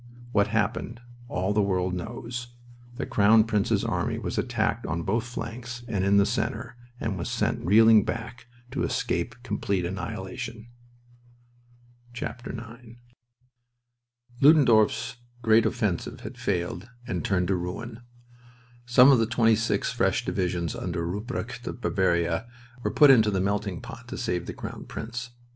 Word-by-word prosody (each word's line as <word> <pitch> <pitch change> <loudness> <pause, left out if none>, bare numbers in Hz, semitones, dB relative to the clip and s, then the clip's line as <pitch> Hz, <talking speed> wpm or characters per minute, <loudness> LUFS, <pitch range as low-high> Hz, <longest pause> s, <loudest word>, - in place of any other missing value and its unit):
What 100 -3 +3
happened 115 +2 -1 0.3
all 95 -2 -1
the 105 - +3
world 95 -2 0
knows. 120 +5 -6 0.4
The 140 - -3
Crown 110 +2 +5
Prince's 105 -3 +1
army - - -1
was - - -3
attacked - - -1
on 85 +1 -2
both 110 +6 0
flanks 120 0 -6
and 100 -5 -1
in 100 +1 +4
the 100 - +5
center, 115 +1 -2 0.2
and 100 -5 -2
was 85 - -3
sent - - -1
reeling 110 +3 +6
back 115 +2 -5 0.2
to 135 - -2
escape 85 - -1
complete 100 -5 -1
annihilation. 110 +5 -5 1.5
IX - - -3 2.1
Ludendorff's 125 -7 +5 0.3
great 110 0 +5
offensive 105 -6 -2
had 110 +4 -8
failed 100 -2 -2 0.2
and 95 - -2
had 90 - -4
turned 95 -5 +1
to 95 - +3
ruin. 110 +7 -5 0.9
Some 125 +2 +7
of 130 - +5
the 115 - +2
twenty 115 -1 +4
six 115 +1 0
fresh - - +1
divisions 90 -3 -1
under 85 - -3
Rupprecht 115 +6 -5
of - - -5
Bavaria 90 -1 +1 0.3
were - - 0
put 145 -2 +7
into 110 -5 +5
the 95 -2 0
melting 100 -1 -1
pot 115 +1 -10
to - - -6
save 90 -8 -2
the - - -4
Crown - - -7
Prince. 120 +2 -6
110 Hz, 145 wpm, -26 LUFS, 95-120 Hz, 2.1 s, Some